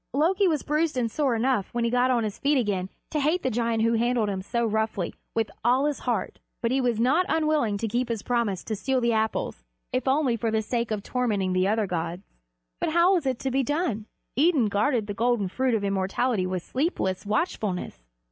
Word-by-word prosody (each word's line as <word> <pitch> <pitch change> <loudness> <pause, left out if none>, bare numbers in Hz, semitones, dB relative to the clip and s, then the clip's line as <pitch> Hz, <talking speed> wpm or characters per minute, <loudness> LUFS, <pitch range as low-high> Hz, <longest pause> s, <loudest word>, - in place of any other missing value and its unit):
Loki 370 +7 +3
was 310 -4 0
bruised 305 -1 0
and 235 -3 0
sore 275 -3 +1
enough 230 -3 0
when 240 - +1
he 235 - +1
got 250 +1 +3
on 240 -3 +2
his 210 -2 -4
feet 285 0 +2
again 200 -6 0 0.2
to 305 - 0
hate 310 +5 +1
the 260 - 0
giant 230 -1 0
who 230 +1 +3
handled 235 -1 +1
him 190 -1 -2
so 235 +4 -1
roughly, 220 -4 -1 0.2
with 225 -1 0
all 250 +4 +3
his 295 -1 -1
heart, 230 -7 -2 0.2
but 235 - 0
he 265 +1 +2
was 240 -3 0
not 265 +10 +3
unwilling 305 -9 +1
to 225 - -2
keep 240 +3 -1
his 225 -3 -3
promise 235 -7 0
to 220 - -3
steal 260 +6 0
the 235 -1 +1
Apples, 220 - -1 0.3
if 255 0 -1
only 265 -2 +2
for 230 0 -1
the 220 0 0
sake 235 +1 -1
of 210 -2 -2
tormenting 210 -8 0
the 185 +1 +2
other 215 +1 +1
gods. 175 0 -3 0.6
But 315 - -1
how 345 +3 +5
was 340 -7 +1
it 260 -2 0
to 265 - -1
be 270 +2 +2
done? 285 - -1 0.3
Idun 285 -6 +3
guarded 215 +3 +1
the 205 - -4
golden 230 -1 +1
fruit 255 +3 +1
of 210 - -1
immortality 195 +2 0
with 185 -2 -3
sleepless 255 - -1
watchfulness. 210 - -2
235 Hz, 215 wpm, -26 LUFS, 210-265 Hz, 0.6 s, how